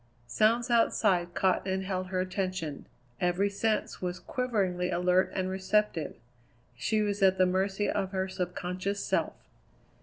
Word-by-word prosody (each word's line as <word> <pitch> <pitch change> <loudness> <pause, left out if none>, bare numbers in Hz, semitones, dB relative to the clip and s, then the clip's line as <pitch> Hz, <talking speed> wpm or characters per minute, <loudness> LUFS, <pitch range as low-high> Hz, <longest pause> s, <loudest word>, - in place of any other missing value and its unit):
Sounds 230 - +2
outside 190 -6 +2
caught 190 0 +1
and 190 0 -1
held 185 -1 -2
her 185 0 -2
attention; 185 -5 -3 0.3
every 180 +3 +1
sense 215 +2 -1
was 180 0 -2
quiveringly 195 -8 -1
alert 180 +1 +2
and 185 -1 0
receptive; 190 -3 0 0.6
she 215 - 0
was 205 -1 -2
at 190 -1 +5
the 185 - +5
mercy 190 +2 0
of 195 -2 -1
her 190 -1 -1
subconscious 185 +2 -3
self. - - 0
190 Hz, 140 wpm, -29 LUFS, 180-205 Hz, 0.6 s, at